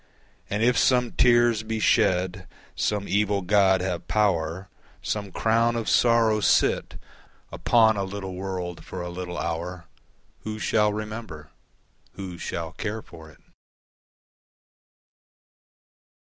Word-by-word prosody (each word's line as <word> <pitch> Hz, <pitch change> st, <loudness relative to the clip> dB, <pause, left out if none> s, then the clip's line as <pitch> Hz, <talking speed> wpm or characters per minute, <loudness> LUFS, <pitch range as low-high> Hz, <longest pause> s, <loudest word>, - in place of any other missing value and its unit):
And 105 Hz, +2 st, -1 dB
if 125 Hz, +1 st, +3 dB
some 125 Hz, -2 st, +3 dB
tears 120 Hz, -2 st, +4 dB
be 110 Hz, 0 st, -4 dB
shed, 95 Hz, -4 st, +1 dB, 0.3 s
Some 105 Hz, -1 st, -1 dB
evil 100 Hz, -1 st, +1 dB
God 95 Hz, -1 st, +3 dB
have 90 Hz, -2 st, -3 dB
power, 95 Hz, -3 st, 0 dB, 0.4 s
Some 100 Hz, -2 st, -3 dB
crown 115 Hz, +4 st, +1 dB
of 115 Hz, -1 st, -3 dB
sorrow 115 Hz, -2 st, +3 dB
sit 105 Hz, -, +2 dB, 0.6 s
Upon 110 Hz, -2 st, +3 dB
a 100 Hz, -, -1 dB
little 95 Hz, -1 st, -6 dB
world 90 Hz, -2 st, -5 dB
for 90 Hz, -1 st, -7 dB
a 90 Hz, -, -5 dB
little 90 Hz, 0 st, -6 dB
hour 85 Hz, +1 st, -4 dB, 0.5 s
Who 110 Hz, 0 st, -6 dB
shall 105 Hz, 0 st, +2 dB
remember? 105 Hz, -8 st, -7 dB, 0.6 s
Who 95 Hz, -3 st, -8 dB
shall 85 Hz, -2 st, -4 dB
care 110 Hz, +5 st, -5 dB
for 80 Hz, -2 st, -13 dB
it? 80 Hz, -, -20 dB
100 Hz, 120 wpm, -25 LUFS, 90-110 Hz, 0.6 s, tears